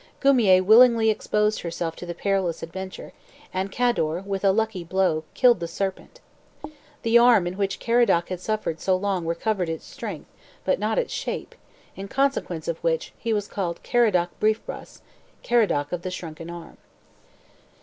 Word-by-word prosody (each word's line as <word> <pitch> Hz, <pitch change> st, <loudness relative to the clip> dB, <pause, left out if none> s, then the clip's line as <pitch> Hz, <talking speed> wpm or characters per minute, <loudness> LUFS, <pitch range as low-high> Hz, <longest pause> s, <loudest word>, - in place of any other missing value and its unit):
Guimier 225 Hz, -10 st, +5 dB
willingly 225 Hz, +1 st, +6 dB
exposed 210 Hz, 0 st, 0 dB
herself 170 Hz, -1 st, -4 dB
to 175 Hz, -, -8 dB
the 175 Hz, -, -5 dB
perilous 190 Hz, -3 st, -1 dB
adventure, 190 Hz, +3 st, -7 dB, 0.4 s
and 190 Hz, +1 st, -2 dB
Cador, 190 Hz, -9 st, 0 dB
with 195 Hz, -1 st, -3 dB
a 195 Hz, -, +5 dB
lucky 220 Hz, -3 st, -1 dB
blow, 170 Hz, -3 st, 0 dB
killed 245 Hz, -6 st, +5 dB
the 170 Hz, -, -3 dB
serpent. 195 Hz, -, -5 dB, 0.8 s
The 230 Hz, +1 st, +5 dB
arm 235 Hz, -6 st, +5 dB
in 175 Hz, +1 st, -3 dB
which 195 Hz, 0 st, -2 dB
Caradoc 230 Hz, -8 st, +2 dB
had 185 Hz, -1 st, -4 dB
suffered 210 Hz, -5 st, -3 dB
so 190 Hz, -, +2 dB
long 185 Hz, -3 st, -2 dB
recovered 180 Hz, +1 st, -1 dB
its 160 Hz, -1 st, -5 dB
strength, -, -, -7 dB, 0.4 s
but -, -, +1 dB
not -, -, -1 dB
its -, -, -1 dB
shape, -, -, -4 dB, 0.4 s
in 195 Hz, +1 st, -7 dB
consequence 265 Hz, -, -1 dB
of 165 Hz, -1 st, -2 dB
which 165 Hz, -1 st, -1 dB
he 230 Hz, -, -2 dB
was 205 Hz, -2 st, 0 dB
called 175 Hz, -4 st, -3 dB
Caradoc 210 Hz, -8 st, +2 dB
Briefbras, 215 Hz, +1 st, -2 dB, 0.4 s
Caradoc 205 Hz, -12 st, +1 dB
of 180 Hz, -, -3 dB
the 185 Hz, -, -4 dB
Shrunken 165 Hz, -2 st, -7 dB
Arm. 170 Hz, -1 st, -10 dB
190 Hz, 160 wpm, -24 LUFS, 170-220 Hz, 0.8 s, willingly